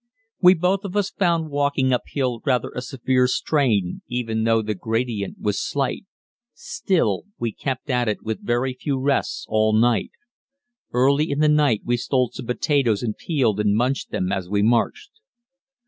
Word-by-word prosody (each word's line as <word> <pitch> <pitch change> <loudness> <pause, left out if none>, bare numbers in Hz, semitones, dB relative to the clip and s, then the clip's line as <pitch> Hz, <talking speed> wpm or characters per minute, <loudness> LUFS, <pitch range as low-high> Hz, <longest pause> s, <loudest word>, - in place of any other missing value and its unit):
We 180 0 +7
both 185 +4 0
of 200 0 -4
us 205 0 0
found 170 -4 0
walking 140 -2 +1
uphill 125 -1 -2
rather 130 -4 0
a 125 - -5
severe 130 0 +1
strain, 120 - 0
even 115 -3 -2
though 115 -1 +3
the 105 0 -2
gradient 110 0 -3
was 105 -1 -1
slight; 140 +7 -2 0.5
still, 140 - -1
we 115 - -2
kept 130 +4 -4
at 125 -2 +1
it 105 - -2
with 110 0 -4
very 120 +2 0
few 135 +2 -3
rests 140 +1 -1
all 110 0 +2
night. 115 -1 +2 0.8
Early 140 +5 +2
in 140 - -1
the 155 +1 +3
night 150 -8 +3
we 120 0 +1
stole 125 0 0
some 125 - -8
potatoes 125 -4 +1
and 110 -3 -2
peeled 125 - 0
and 105 -1 +2
munched 125 +4 0
them 90 +1 -2
as 95 -3 -3
we 100 0 +1
marched. 120 - +1
125 Hz, 165 wpm, -22 LUFS, 110-140 Hz, 0.8 s, We